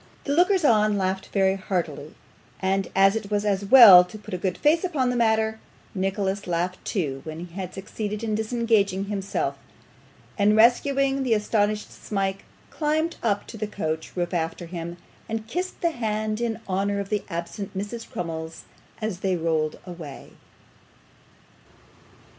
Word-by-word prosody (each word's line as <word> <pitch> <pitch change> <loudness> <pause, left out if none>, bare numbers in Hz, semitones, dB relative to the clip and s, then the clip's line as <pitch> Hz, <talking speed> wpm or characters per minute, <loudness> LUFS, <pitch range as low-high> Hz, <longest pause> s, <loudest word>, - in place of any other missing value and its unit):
The 285 - -1
lookers 360 +1 +3
on 215 -4 +4
laughed 190 0 -1
very 195 -1 +2
heartily, 170 -6 -3 0.4
and 195 0 0
as 195 +2 +5
it 220 -2 -4
was 205 0 0
as 200 -1 +1
well 200 -6 +10
to 180 +4 -10
put 210 - -10
a - - 0
good 185 -1 -2
face 315 +4 +3
upon 280 -9 0
the - - -2
matter, 220 -1 +2 0.3
Nicholas 195 0 -2
laughed 175 +1 -2
too 140 -9 -2
when 160 +2 -6
he 170 - -16
had 185 -1 -6
succeeded 210 +2 -5
in 220 -1 -1
disengaging 220 -3 +1
himself; 200 -1 -2 0.8
and 205 +1 +4
rescuing 270 +4 +3
the 245 -4 +2
astonished 210 0 0
Smike, 195 -1 -3 0.3
climbed 315 +2 0
up 205 -3 0
to 225 - -9
the 215 0 -3
coach 160 -6 -4
roof 175 +1 -1
after 165 0 -2
him, 170 0 -6 0.3
and 220 0 -3
kissed 360 +10 -3
his 340 - +3
hand 215 -2 -2
in 230 -1 -2
honour 200 +1 0
of 200 -1 -4
the 210 -1 -1
absent 170 +3 -5
Mrs. 205 +4 -5
Crummles 165 -4 -5 0.4
as 210 -5 -2
they 190 -1 0
rolled 160 -2 0
away. 170 -6 -9
200 Hz, 155 wpm, -25 LUFS, 185-225 Hz, 0.8 s, well